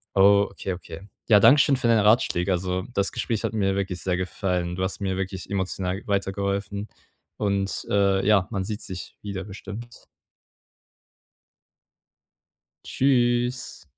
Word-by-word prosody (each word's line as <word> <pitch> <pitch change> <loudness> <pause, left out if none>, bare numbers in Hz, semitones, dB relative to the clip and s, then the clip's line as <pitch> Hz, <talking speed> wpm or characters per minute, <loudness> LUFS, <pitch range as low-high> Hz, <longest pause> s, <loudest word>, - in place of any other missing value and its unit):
Oh. 100 +1 +6
Okay, 95 - -4
okay. 85 -1 -9 0.3
Ja, 105 -2 +7
danke 125 +8 +7
schön 140 - +3
für 125 -2 0
deine 115 -3 +4
Ratschläge. 100 -5 +3
Also, 90 0 -1
das 100 0 0
Gespräch 115 -1 -2
hat 115 - -2
mir 95 -3 +1
wirklich 95 -2 -2
sehr 90 -1 0
gefallen. 90 0 -2
Du 95 - -2
hast 95 - -2
mir 95 -2 -1
wirklich 95 -1 -5
emotional 95 0 -2
weitergeholfen 100 +1 -2 0.5
und, 100 -1 -1
äh, 100 -1 +2
ja, 100 -3 +4
man 100 -4 -2
sieht 105 +3 -4
sich 90 -2 -7
wieder 100 -2 -5
bestimmt. 105 +4 -9 2.8
Tschüss. 125 - 0
100 Hz, 135 wpm, -25 LUFS, 95-105 Hz, 2.8 s, Ja